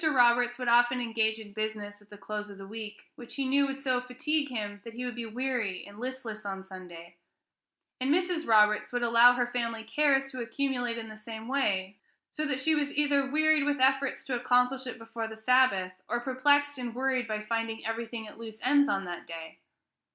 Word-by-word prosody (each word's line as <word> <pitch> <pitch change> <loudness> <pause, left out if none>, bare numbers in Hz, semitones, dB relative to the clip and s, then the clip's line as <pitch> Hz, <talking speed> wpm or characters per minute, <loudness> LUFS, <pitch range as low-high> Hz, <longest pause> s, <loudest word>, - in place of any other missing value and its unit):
Roberts 245 -2 +4
would 250 -1 -4
often 240 +1 +4
engage 225 -2 0
in 210 -2 -11
business 210 -1 -4
at 205 - -22
the 205 - -12
close 210 +1 -5
of 200 - -11
the 195 - -9
week, 215 0 -9
which 240 - -10
he 275 - -1
knew 280 +1 +3
would 270 0 -5
so 255 -2 0
fatigue 285 +4 -1
him 205 -4 -5
that 230 -1 -10
he 250 +1 -4
would 245 - -3
be 235 -1 -5
weary 235 -5 -2
and 200 +1 -13
listless 245 -4 -6
on 195 -1 -5
Sunday; 175 -3 -11 0.8
and 260 +2 0
Mrs. 350 -1 +1
Roberts 210 -1 +4
would 245 0 -1
allow 235 +1 +7
her 245 0 +1
family 235 -2 -3
cares 270 +2 +2
to 255 - -5
accumulate 245 -1 -2
in 225 -1 -6
the 215 0 -10
same 220 +1 -8
way, 200 -8 0 0.3
so 305 0 -2
that 265 -3 -1
she 315 +4 +2
was 290 -2 0
either 285 -2 +2
wearied 310 0 +4
with 290 -1 0
efforts 270 +1 +2
to 260 - -2
accomplish 250 +2 +2
it 250 - -5
before 225 0 -5
the 220 0 -9
Sabbath, 220 -6 +3 0.2
or 240 - 0
perplexed 285 +2 +2
and 240 -2 -5
worried 260 -2 0
by 215 -1 -2
finding 225 +1 -3
everything 225 0 -4
at 210 - -13
loose 220 -1 -9
ends 285 +3 +4
on 195 -7 0
that 175 -1 -7
day. 165 -1 -8
240 Hz, 205 wpm, -29 LUFS, 215-265 Hz, 0.8 s, allow